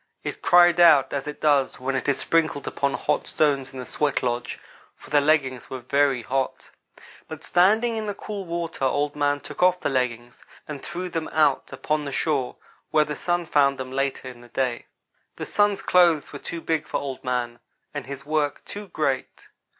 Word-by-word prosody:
It - - -5
cried 175 0 +5
out, 150 -6 +6
as 140 0 -3
it 150 - -6
does 145 -3 +2
when 135 +1 -2
it 130 +2 -1
is 140 - +2
sprinkled 160 -4 0
upon 140 0 -1
hot 150 -1 -1
stones 140 -3 +1
in 135 - -10
the 125 - -6
sweat 150 +3 -1
lodge, 120 -1 -2 0.4
for - - -16
the 145 -1 +5
leggings 140 -4 +1
were 130 - -5
very 135 0 +1
hot. 135 +2 -3 0.6
But 160 0 -9
standing 220 +6 +3
in 215 -1 -3
the 205 - -3
cool 205 -1 -6
water 170 -4 -4
Old 145 +2 0
man 145 -1 0
took - - -8
off 180 0 +4
the - - -1
leggings 120 -2 -2 0.2
and 145 -3 -6
threw 180 +1 -5
them 165 -2 -3
out 150 -3 +1
upon 150 0 -2
the 140 - -4
shore, 140 -3 -1 0.3
where 155 -1 +3
the 150 - -4
Sun 175 +3 -1
found 140 -3 +3
them 130 -1 -6
later 135 0 -2
in 125 -2 -10
the 120 - -14
day. 120 0 -2 0.5
"The - - -5
Sun's 205 -1 +1
clothes 170 -5 +3
were 145 - -6
too 170 +3 -6
big 160 -2 -1
for - - -1
Old 135 -2 -5
man, 120 -2 -2 0.3
and 145 -3 -5
his 140 0 -7
work 150 -1 -1
too 205 0 -7
great. 140 -7 -3
145 Hz, 195 wpm, -24 LUFS, 135-165 Hz, 0.6 s, out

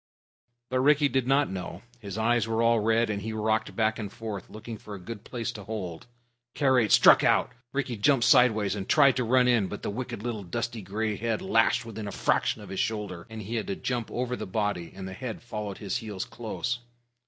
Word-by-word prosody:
But 130 - +1
Rikki 145 +2 +4
did 130 -1 0
not 140 -1 +3
know. 90 0 -6 0.2
His 100 -3 -7
eyes 115 0 +2
were 115 +1 +1
all 115 0 +4
red, 115 +1 +2
and 100 -1 -3
he 110 +2 -4
rocked 110 0 0
back 110 0 +1
and 105 -3 -5
forth, 110 -4 -6
looking 110 0 -8
for 105 -1 -8
a - - -8
good 105 +3 -8
place 120 -2 -4
to 105 -3 -9
hold. 95 -5 -6 0.5
Karait 130 -6 +3
struck - - +7
out. - - +3 0.2
Rikki 130 -4 -2
jumped 120 +2 +3
sideways 115 -7 +5
and 100 -2 -5
tried 140 -4 +6
to 125 - +1
run 125 +2 +4
in, 115 -6 +3
but 105 - -7
the - - -2
wicked 120 -1 -5
little 120 -3 -3
dusty 115 +4 -3
gray 105 +2 -2
head 115 -1 -1
lashed 115 +1 +2
within 110 -2 -6
a - - -4
fraction 105 - 0
of - - -11
his 95 - -4
shoulder, 105 -4 -3
and 110 -1 -7
he 115 +4 -3
had 110 - -3
to 100 - -2
jump 120 -3 -3
over 125 0 -2
the - - -6
body, 100 -4 -2
and 95 -1 -6
the 95 - -6
head 120 +2 -5
followed 105 -5 -5
his 100 - -2
heels 105 -4 -5
close. 120 +1 -4
110 Hz, 220 wpm, -28 LUFS, 105-120 Hz, 0.5 s, struck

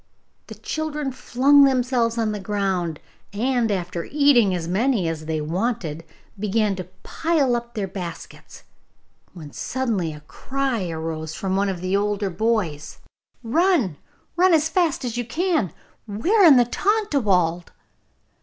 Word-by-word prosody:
The - - -9
children 300 -3 -3
flung 275 +3 +4
themselves 250 -3 +2
down 225 -2 0
on - - -1
the 210 - -4
ground, 190 -5 -2 0.3
and, 240 +2 0
after 180 -3 -3
eating 275 -10 +4
as 165 -2 -4
many 205 +1 +1
as 155 -1 -4
they 160 -1 -1
wanted, 170 -1 -2 0.4
began 210 0 +1
to 185 - -5 0.2
pile 310 -7 +1
up 235 0 -5
their 205 -3 -2
baskets, 180 -3 -9 0.7
when 155 -5 -11
suddenly 225 -11 -2
a 150 -1 -10
cry 255 - -3
arose 160 -1 -5
from 190 -1 -2
one 200 +1 +1
of 180 -3 -4
the 185 +1 -1
older 205 -1 0
boys: 190 -8 -1 0.5
'Run, 280 - +2 0.4
run 360 0 +5
as 315 0 +1
fast 325 -6 0
as 240 -1 -3
you 245 - -1
can! 310 - 0 0.4
We 215 - -2
are 405 -4 +6
in 305 -5 +9
the 245 - +5
Tontlawald! 220 - +1
215 Hz, 145 wpm, -23 LUFS, 180-270 Hz, 0.7 s, in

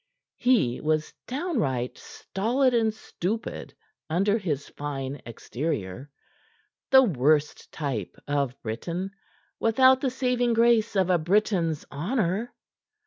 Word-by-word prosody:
He 215 - +2
was 155 0 0
downright 230 - -1
stolid 245 +6 -1
and 225 -2 +3
stupid 215 0 -5 0.3
under 200 +7 +2
his 150 -8 -3
fine 140 -1 -5
exterior; 120 - -4 0.8
the 265 0 +8
worst 150 - +1
type 135 - -4
of 140 -3 -1
Briton, 170 - -4 0.5
without 260 +3 +5
the 270 - +1
saving 250 -2 +1
grace 230 -1 +3
of 185 -2 +3
a 175 - +4
Briton's 175 -3 +1
honor. 195 - -1
185 Hz, 105 wpm, -26 LUFS, 145-235 Hz, 0.8 s, the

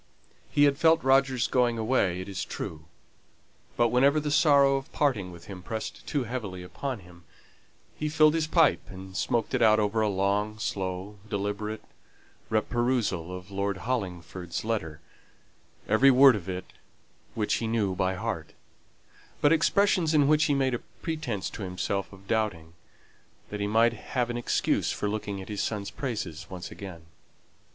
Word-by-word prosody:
He 145 - +3
had 140 0 +4
felt 165 0 +4
Roger's 135 -2 +3
going 120 -2 +2
away, 110 -6 +1
it 95 - -7
is 100 -1 -4
true; 80 -1 -6 0.9
but 120 -1 +4
whenever 140 +5 +4
the 150 0 -2
sorrow 140 -3 +5
of 135 0 -4
parting 110 -11 0
with 85 -2 -12
him 95 0 -8
pressed 110 +4 -6
too 145 -3 0
heavily 105 -7 -5
upon 125 +5 -5
him, 90 -1 -16 0.7
he 150 - -2
filled 155 0 +5
his 160 -1 0
pipe, 160 -3 +4
and 95 0 -10
smoked 115 +3 0
it - - +1
out 110 -1 +6
over 105 +1 +1
a 110 - +2
long, 100 +2 0
slow, 100 -2 -4
deliberate, 105 +1 -3 0.7
re 110 -1 +3
perusal 120 -9 -1
of 90 +2 -8
Lord 100 0 -1
Hollingford's 90 -6 -3
letter, 80 -9 -3 0.9
every 130 +6 +5
word 135 -1 +7
of 95 -3 -6 0.9
which 105 -2 0
he 115 - -2
knew 110 -4 0
by 95 0 0
heart; 95 -6 -4 0.9
but 145 +2 +5
expressions 175 -1 +3
in 145 -2 +5
which 155 +1 +4
he 145 - +2
made 135 -2 +1
a 120 - -1
pretence 140 - -4
to - - -8
himself 95 +1 -2
of 95 0 -15
doubting, 100 -8 -1 0.8
that 105 - -4
he 100 - -1
might 115 +2 +4
have 120 +2 -2
an 120 - -3
excuse 120 - 0
for 105 - -2
looking 100 -2 -3
at - - -13
his 105 -2 -3
son's 100 -2 -3
praises 105 - -4
once 90 -1 -7
again. 90 -5 -9
110 Hz, 160 wpm, -28 LUFS, 95-130 Hz, 0.9 s, word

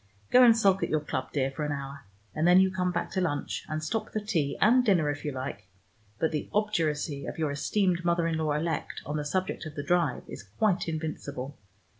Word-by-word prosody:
Go 250 - +7
and 230 -2 +7
sulk 195 -3 +3
at - - 0
your 155 - +2
club, 140 -3 -4
dear, 135 -2 0
for 145 +3 -4
an 150 - -1
hour, 140 -2 -6 0.3
and 155 +2 +1
then 180 +1 +7
you 190 0 +4
come 180 -1 0
back 180 - -3
to 185 - 0
lunch, 145 -5 -2
and 155 0 -3
stop 215 +8 -2
for 215 - -1
tea 165 -10 -1
and 245 +5 +5
dinner 175 -10 +3
if 145 0 -7
you 150 - -2
like. 130 -7 -6 0.5
But 160 - 0
the 150 -2 -3
obduracy 160 -9 0
of - - -6
your 155 -3 0
esteemed 180 +4 0
mother 170 -1 +2
in 165 -1 0
law 155 -2 0
elect 160 +2 -2
on 150 +1 -3
the 150 - -2
subject 185 +5 -2
of 155 - -10
the 145 - -4
drive 170 -6 +1
is - - -8
quite 175 - 0
invincible. 145 -4 -4
160 Hz, 225 wpm, -28 LUFS, 145-185 Hz, 0.5 s, Go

